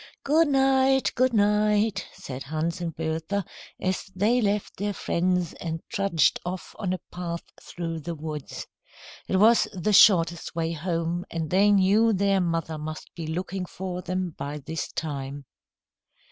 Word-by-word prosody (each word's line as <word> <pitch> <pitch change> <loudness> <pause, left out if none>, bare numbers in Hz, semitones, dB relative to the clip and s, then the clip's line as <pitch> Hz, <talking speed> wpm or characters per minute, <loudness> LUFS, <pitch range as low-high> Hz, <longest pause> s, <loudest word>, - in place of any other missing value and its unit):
"Good 315 +3 +4
night, 270 -1 +3
good 255 +1 +2
night," 210 -1 +2
said 130 0 -8
Hans 160 +5 -3
and 165 -3 -3
Bertha, 165 +5 -2 0.3
as 185 0 -1
they 220 +6 +3
left 205 -1 -1
their 205 +1 -1
friends 180 0 0
and 165 -1 -4
trudged 195 -9 +2
off 180 +1 -6
on 195 -4 -1
a 185 - 0
path 170 -1 -4 0.2
through 165 -2 -5
the 165 +2 -5
woods. 150 -2 -6 0.6
It 190 - +1
was 225 +4 +5
the 200 +3 0
shortest 170 -5 +5
way 165 -1 -1
home, 170 +1 -2
and 160 -2 -4
they 195 +3 +5
knew 205 +3 +4
their 195 0 +2
mother 165 -2 -2
must 155 +1 -7
be 165 -2 -6
looking 180 +3 -3
for 180 0 -5
them 185 -1 -3
by 145 +1 -5
this 155 +2 -5
time. 140 -2 -5
180 Hz, 150 wpm, -26 LUFS, 165-205 Hz, 0.6 s, was